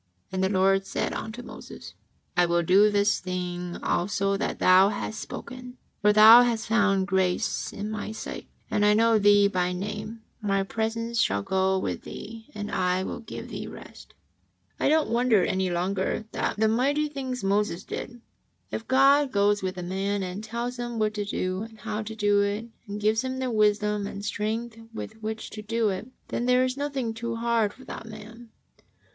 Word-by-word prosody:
'' 90 Hz, -, -42 dB
And 190 Hz, 0 st, -1 dB
the 190 Hz, -, +2 dB
Lord 195 Hz, 0 st, +2 dB
said -, -, -2 dB
unto 230 Hz, +3 st, -6 dB
Moses: -, -, -10 dB, 0.4 s
"I 175 Hz, 0 st, +4 dB
will 170 Hz, 0 st, +2 dB
do 195 Hz, +5 st, +5 dB
this 205 Hz, 0 st, +2 dB
thing 180 Hz, -1 st, -4 dB
also 195 Hz, +2 st, 0 dB
that -, -, -2 dB
thou 185 Hz, +2 st, +6 dB
hast 215 Hz, +1 st, -4 dB
spoken, 250 Hz, +1 st, -8 dB, 0.2 s
for 210 Hz, 0 st, +5 dB
thou 220 Hz, +3 st, +9 dB
hast 235 Hz, -2 st, 0 dB
found 200 Hz, -4 st, +2 dB
grace 190 Hz, +1 st, 0 dB
in 210 Hz, +1 st, -5 dB
My 215 Hz, 0 st, -4 dB
sight, 220 Hz, -, -7 dB, 0.2 s
and 210 Hz, -, +1 dB
I 210 Hz, 0 st, +5 dB
know 225 Hz, 0 st, +4 dB
thee 205 Hz, 0 st, +6 dB
by 180 Hz, -2 st, 0 dB
name. 210 Hz, +4 st, -5 dB, 0.2 s
My 195 Hz, -2 st, +1 dB
presence 230 Hz, +3 st, -1 dB
shall 100 Hz, -, +1 dB
go 190 Hz, -, +1 dB
with 190 Hz, -, -3 dB
thee, 225 Hz, +1 st, -9 dB
and 205 Hz, 0 st, -5 dB
I 185 Hz, 0 st, +1 dB
will -, -, -5 dB
give 235 Hz, -, -8 dB
thee -, -, -6 dB
rest." -, -, -12 dB, 0.6 s
I -, -, +2 dB
don't 315 Hz, 0 st, +3 dB
wonder 235 Hz, -4 st, +3 dB
any 190 Hz, 0 st, 0 dB
longer 185 Hz, +4 st, -1 dB
at -, -, -1 dB
the 220 Hz, +1 st, +3 dB
mighty 275 Hz, +7 st, +1 dB
things 260 Hz, -4 st, -5 dB
Moses 195 Hz, -2 st, 0 dB
did. 240 Hz, -1 st, -7 dB, 0.5 s
If 225 Hz, -, -5 dB
(jod 275 Hz, +2 st, +5 dB
goes 205 Hz, 0 st, +2 dB
with 185 Hz, -1 st, -3 dB
a 180 Hz, -, -4 dB
man 195 Hz, +2 st, -1 dB
and 185 Hz, +3 st, -5 dB
tells 235 Hz, +3 st, -4 dB
him 240 Hz, -1 st, -4 dB
what 215 Hz, -1 st, +1 dB
to 210 Hz, -1 st, -3 dB
do 185 Hz, -1 st, -2 dB
and 225 Hz, 0 st, -8 dB
how 215 Hz, 0 st, -4 dB
to 220 Hz, +1 st, -7 dB
do 205 Hz, -1 st, +3 dB
it, 205 Hz, +2 st, -1 dB, 0.2 s
and 205 Hz, +1 st, -5 dB
gives 215 Hz, +2 st, +2 dB
him 260 Hz, 0 st, -3 dB
the 260 Hz, -1 st, -2 dB
wisdom 210 Hz, -1 st, +2 dB
and 200 Hz, 0 st, -7 dB
strength 220 Hz, +2 st, -3 dB, 0.2 s
with 220 Hz, 0 st, -7 dB
which 220 Hz, 0 st, -5 dB
to 215 Hz, -, -7 dB
do 225 Hz, +1 st, 0 dB
it, 190 Hz, +4 st, -4 dB, 0.2 s
then 240 Hz, -, -2 dB
there 250 Hz, 0 st, +4 dB
is 255 Hz, 0 st, -2 dB
nothing 275 Hz, -5 st, -2 dB
too 230 Hz, +1 st, -4 dB
hard 230 Hz, -2 st, +1 dB
for 260 Hz, +4 st, -16 dB
that 225 Hz, -, -8 dB
man. 225 Hz, +2 st, -11 dB
210 Hz, 190 wpm, -26 LUFS, 195-230 Hz, 0.6 s, thou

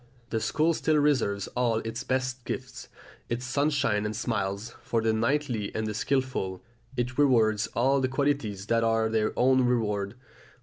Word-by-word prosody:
The 110 Hz, -, +1 dB
school 155 Hz, +8 st, +1 dB
still 155 Hz, 0 st, +1 dB
reserves 130 Hz, -10 st, +2 dB
all 120 Hz, -2 st, +1 dB
its 115 Hz, +2 st, -4 dB
best 130 Hz, -1 st, -1 dB
gifts, -, -, -6 dB, 0.4 s
its 120 Hz, +2 st, -2 dB
sunshine 140 Hz, -5 st, +1 dB
and 105 Hz, 0 st, -3 dB
smiles, 105 Hz, -2 st, -2 dB
for 115 Hz, -, 0 dB
the 110 Hz, 0 st, +1 dB
knightly 115 Hz, -2 st, 0 dB
and 110 Hz, -, -1 dB
the 105 Hz, -, -2 dB
skilful; 130 Hz, -6 st, -1 dB, 0.3 s
it 125 Hz, +3 st, -2 dB
rewards 115 Hz, -6 st, +3 dB
all 135 Hz, +3 st, +3 dB
the 130 Hz, -, +2 dB
qualities 130 Hz, -8 st, -1 dB
that 115 Hz, +1 st, +2 dB
are 115 Hz, 0 st, +2 dB
their 110 Hz, -1 st, +1 dB
own 130 Hz, +1 st, +4 dB
reward. 105 Hz, -4 st, 0 dB
120 Hz, 160 wpm, -28 LUFS, 110-130 Hz, 0.4 s, own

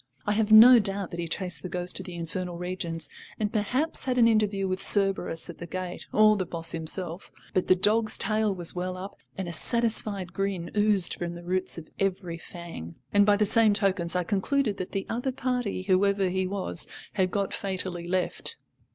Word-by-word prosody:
I -, -, 0 dB
have 215 Hz, 0 st, 0 dB
no 235 Hz, +3 st, +10 dB
doubt 195 Hz, -2 st, -1 dB
that 170 Hz, -, -6 dB
he 170 Hz, -, -3 dB
chased 180 Hz, +1 st, -4 dB
the 185 Hz, -, -6 dB
ghost 180 Hz, +1 st, -1 dB
to -, -, -3 dB
the 180 Hz, -2 st, -8 dB
infernal 175 Hz, +1 st, -5 dB
regions 170 Hz, -3 st, -4 dB, 0.3 s
and 210 Hz, -1 st, -2 dB
perhaps 255 Hz, +10 st, +3 dB
had 255 Hz, -1 st, -1 dB
an 235 Hz, -2 st, +6 dB
interview 210 Hz, -3 st, +1 dB
with 185 Hz, 0 st, -2 dB
Cerberus 195 Hz, -5 st, +2 dB
at 170 Hz, -, -10 dB
the 170 Hz, -, -7 dB
gate, 185 Hz, 0 st, -6 dB
or 215 Hz, 0 st, +5 dB
the 195 Hz, -, -1 dB
boss 165 Hz, 0 st, -1 dB
himself; 165 Hz, +2 st, -2 dB, 0.2 s
but 185 Hz, -, 0 dB
the 185 Hz, -, +5 dB
dog's 215 Hz, +4 st, +2 dB
tail 215 Hz, -1 st, +1 dB
was 175 Hz, -3 st, -1 dB
well 185 Hz, +1 st, -4 dB
up 190 Hz, +2 st, -8 dB, 0.2 s
and 190 Hz, -2 st, -4 dB
a -, -, -4 dB
satisfied 210 Hz, -1 st, 0 dB
grin 195 Hz, -3 st, -3 dB
oozed 205 Hz, -4 st, +3 dB
from 175 Hz, 0 st, -5 dB
the 175 Hz, -, -10 dB
roots 185 Hz, +1 st, 0 dB
of 160 Hz, -1 st, -9 dB
every 185 Hz, -3 st, -2 dB
fang, 165 Hz, -, -9 dB, 0.2 s
and 205 Hz, 0 st, +4 dB
by 205 Hz, -, +5 dB
the 210 Hz, -, +2 dB
same 220 Hz, 0 st, +4 dB
tokens 190 Hz, -4 st, 0 dB
I 180 Hz, -, +1 dB
concluded 210 Hz, +4 st, 0 dB
that 185 Hz, -2 st, -6 dB
the 195 Hz, -, -3 dB
other 245 Hz, +3 st, -2 dB
party, 250 Hz, -7 st, -2 dB
whoever 195 Hz, 0 st, +2 dB
he 190 Hz, 0 st, -1 dB
was, 190 Hz, -2 st, -1 dB, 0.3 s
had 190 Hz, -3 st, +1 dB
got 200 Hz, +1 st, -2 dB
fatally 185 Hz, -3 st, -4 dB
left. 185 Hz, -, -1 dB
190 Hz, 200 wpm, -27 LUFS, 180-210 Hz, 0.3 s, no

